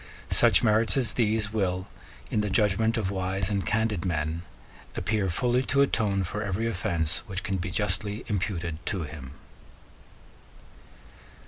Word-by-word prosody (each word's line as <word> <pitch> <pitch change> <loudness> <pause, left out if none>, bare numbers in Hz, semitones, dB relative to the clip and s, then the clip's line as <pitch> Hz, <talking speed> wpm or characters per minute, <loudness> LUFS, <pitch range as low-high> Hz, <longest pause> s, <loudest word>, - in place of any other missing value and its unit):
Such - - +5
merits 110 +2 +4
as 120 -5 +4
these 110 -2 +1
will, 95 -3 -1 0.4
in 105 - +2
the 105 - -1
judgment 105 +3 +2
of 100 -4 -1
wise 95 +1 -2
and 100 -2 0
candid 110 -4 0
men, 80 -2 -1 0.5
appear 105 -3 0
fully 125 +7 +1
to 140 0 +4
atone 100 -7 +1
for 100 +3 -4
every 100 +2 -1
offence 85 -6 -1
which 95 -2 -3
can 95 -1 -1
be 90 0 -3
justly 105 +2 -1
imputed 90 -5 -2
to 95 -5 -1
him. 75 -4 -8
100 Hz, 140 wpm, -27 LUFS, 90-110 Hz, 0.5 s, Such